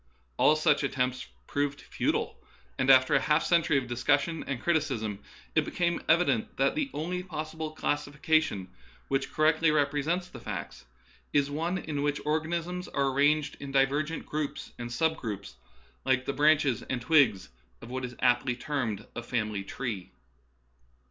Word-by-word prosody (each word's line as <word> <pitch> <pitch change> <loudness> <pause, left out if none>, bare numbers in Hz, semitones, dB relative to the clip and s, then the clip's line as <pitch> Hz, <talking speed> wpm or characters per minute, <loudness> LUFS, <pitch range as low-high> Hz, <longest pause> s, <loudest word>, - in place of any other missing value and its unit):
All 155 - +5
such 150 -1 +2
at 140 - -1
tempts 125 -1 -1 0.2
proved 145 0 -1
futile, - - -2 0.4
and 130 - +1
after 130 -1 +7
a - - +5
half 150 +1 +2
century 170 -4 +3
of 135 - 0
discussion 145 +7 +1
and 140 -3 -2
criticism 130 -12 0 0.3
it - - +3
became 175 -1 -1
evident 150 -9 +2
that 135 - +3
the 295 -1 -1
only 180 +4 -3
possible 160 -3 -5
classification 145 -7 0 0.4
which 135 0 0
correctly 155 +1 +3
represents 150 +4 +1
the - - -11
facts - - -6 0.5
is 145 -1 +2
one 165 +5 -1
in 155 -5 -3
which 145 0 0
organisms 170 +4 -1
are 140 -1 0
arranged 145 +1 +2
in 140 -1 -7
divergent 145 +4 +1
groups 150 -1 -4
and 120 0 -5
sub 160 +6 +1
groups, 100 - -6 0.5
like 130 -1 +1
the 140 - -1
branches 145 -4 +3
and 130 - -3
twigs 120 - +4 0.3
of 120 - -9
what 130 0 -3
is 125 0 -5
aptly 125 0 +3
termed 120 -6 -3
a - - -3
family 110 -4 -2
tree. 105 -3 -5
145 Hz, 155 wpm, -29 LUFS, 125-155 Hz, 0.5 s, after